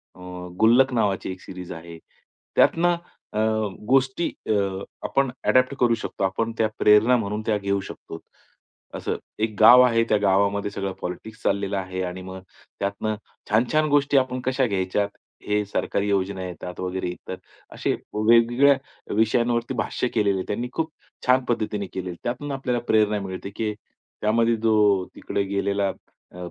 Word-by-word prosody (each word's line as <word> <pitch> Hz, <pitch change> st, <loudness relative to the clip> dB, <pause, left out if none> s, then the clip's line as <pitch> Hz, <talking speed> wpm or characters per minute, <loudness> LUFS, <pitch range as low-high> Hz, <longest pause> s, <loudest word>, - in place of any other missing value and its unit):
अ, -, -, -17 dB, 0.4 s
गुल्लक 125 Hz, +4 st, +5 dB
नावाची 100 Hz, -5 st, 0 dB
एक 90 Hz, -, -9 dB
सीरीज 90 Hz, -1 st, -9 dB
आहे, 85 Hz, 0 st, -10 dB, 0.6 s
त्यातनं 175 Hz, +1 st, +4 dB, 0.4 s
अ, -, -, -3 dB, 0.5 s
गोष्टी 135 Hz, +4 st, +2 dB, 0.2 s
अ, -, -, +4 dB, 0.5 s
आपण 135 Hz, -2 st, +1 dB, 0.2 s
एडॉप्ट 130 Hz, +1 st, +4 dB
करू 120 Hz, -2 st, +4 dB
शकतो, 110 Hz, -3 st, -5 dB
आपण 105 Hz, +5 st, 0 dB
त्या 110 Hz, -, +3 dB
प्रेरणा 105 Hz, +4 st, +6 dB
म्हणून 105 Hz, -1 st, -2 dB
त्या 105 Hz, -, +2 dB
घेऊ 100 Hz, 0 st, -1 dB
शकतो, 80 Hz, -, -9 dB, 0.8 s
असं. -, -, -3 dB, 0.3 s
एक 110 Hz, -2 st, -1 dB
गाव 125 Hz, +3 st, +9 dB
आहे, 115 Hz, -2 st, +3 dB
त्या 105 Hz, -, +4 dB
गावामध्ये 100 Hz, +1 st, +2 dB
सगळं 100 Hz, -1 st, -3 dB
पॉलिटिक्स 100 Hz, +5 st, -6 dB
चाललेलं 100 Hz, 0 st, 0 dB
आहे, 95 Hz, -1 st, -4 dB
आणि 90 Hz, 0 st, -5 dB
मग 95 Hz, 0 st, -8 dB, 0.4 s
त्यातनं 100 Hz, +2 st, -2 dB, 0.4 s
छान-छान 125 Hz, +8 st, +3 dB
गोष्टी 145 Hz, -1 st, +3 dB
आपण 130 Hz, -1 st, +1 dB
कशा 130 Hz, +1 st, +2 dB
घ्यायच्यात, 100 Hz, 0 st, 0 dB, 0.4 s
हे 105 Hz, 0 st, +1 dB
सरकारी 100 Hz, 0 st, -1 dB
योजना 95 Hz, -1 st, 0 dB
येतात, 90 Hz, 0 st, -8 dB
वगैरे 90 Hz, 0 st, -2 dB
इतर, 90 Hz, +1 st, -7 dB, 0.4 s
असे -, -, -1 dB, 0.2 s
वेगवेगळ्या 115 Hz, +6 st, +5 dB, 0.4 s
विषयांवरती 120 Hz, +2 st, +1 dB
भाष्य -, -, -2 dB
केलेलं 100 Hz, -3 st, +2 dB
आहे 95 Hz, -, -3 dB
त्यांनी, 120 Hz, +4 st, -3 dB
खूप 160 Hz, 0 st, -1 dB, 0.4 s
छान 130 Hz, 0 st, +5 dB
पद्धतीने 105 Hz, -3 st, -1 dB
केलेलं 95 Hz, -1 st, -4 dB
आहे. 85 Hz, -, -10 dB
त्यातून 130 Hz, +4 st, -3 dB
आपल्याला 125 Hz, -3 st, -1 dB
प्रेरणा 105 Hz, -1 st, +3 dB
मिळते, 95 Hz, +1 st, -6 dB
की 110 Hz, -1 st, -1 dB, 0.5 s
त्यामध्ये 115 Hz, +2 st, +3 dB
जो 105 Hz, -4 st, +3 dB
तिकडे 100 Hz, -, -2 dB
गेलेला 100 Hz, 0 st, 0 dB, 0.4 s
अ, -, -, -14 dB
105 Hz, 150 wpm, -24 LUFS, 100-120 Hz, 0.8 s, गाव